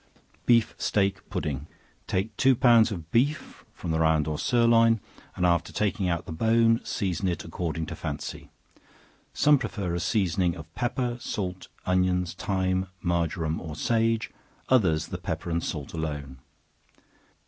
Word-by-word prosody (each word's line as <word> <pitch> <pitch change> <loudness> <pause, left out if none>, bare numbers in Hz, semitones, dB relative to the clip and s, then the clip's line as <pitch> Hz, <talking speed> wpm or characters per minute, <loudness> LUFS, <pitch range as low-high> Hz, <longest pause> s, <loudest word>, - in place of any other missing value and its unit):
Beef 115 -2 +4
Steak 100 -2 0
Pudding. 70 0 -3 0.4
Take 100 +3 -1
two 135 +2 +4
pounds 115 -2 +5
of 85 -4 -6
beef 140 +6 0
from 85 - -5
the 80 - +1
round 80 -1 +3
or 75 -1 -2
sirloin, 115 -2 +4 0.4
and 90 - 0
after 85 -1 +2
taking 100 -3 0
out 85 -1 -1
the - - -7
bone, 115 +6 +3
season 95 -4 -2
it 85 - -2
according 80 -1 -3
to 85 +2 -6
fancy; 75 -3 -6 0.8
some 145 -1 +4
prefer 95 -9 -3
a 85 - -1
seasoning 90 -2 +1
of 80 -1 -11
pepper, 120 +2 -1
salt, 95 -5 -4 0.2
onions, 90 -1 +1
thyme, 95 0 -1 0.2
marjoram 85 -2 0
or 80 -2 -6
sage; 115 +6 +1 0.4
others 90 -12 +3
the 90 - -5
pepper 85 -1 -4
and 85 0 0
salt 75 -4 -4
alone. 75 -5 -4
90 Hz, 145 wpm, -27 LUFS, 80-115 Hz, 0.8 s, pounds